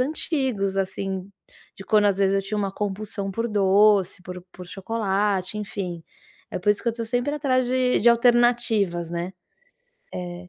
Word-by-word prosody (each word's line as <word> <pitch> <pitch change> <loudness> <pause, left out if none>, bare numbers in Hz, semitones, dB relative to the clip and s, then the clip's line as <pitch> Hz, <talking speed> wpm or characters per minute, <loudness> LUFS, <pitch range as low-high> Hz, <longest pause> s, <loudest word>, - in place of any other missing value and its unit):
antigos, 260 - 0
assim, 190 -1 -3 0.5
de - - -9
quando 210 +1 +3
às 200 -1 +1
vezes 195 0 +3
eu 195 - 0
tinha 210 +2 -3
uma 200 -2 -1
compulsão 200 0 -4
por 230 +4 -2
doce, 200 -2 +3
por 180 0 -8
por 180 0 -10
chocolate. 195 0 -1
Enfim, 195 -5 -5 0.5
é - - -3
por 180 - -3
isso 205 - 0
que 235 - 0
eu - - +3
estou 230 0 -5
sempre 245 +5 -1
atrás 260 -4 +1
de 255 0 +1
de 235 - +6
alternativas, 235 -7 +2
né, 175 +2 -4 0.8
eh, 180 0 -7
200 Hz, 165 wpm, -24 LUFS, 190-235 Hz, 0.8 s, de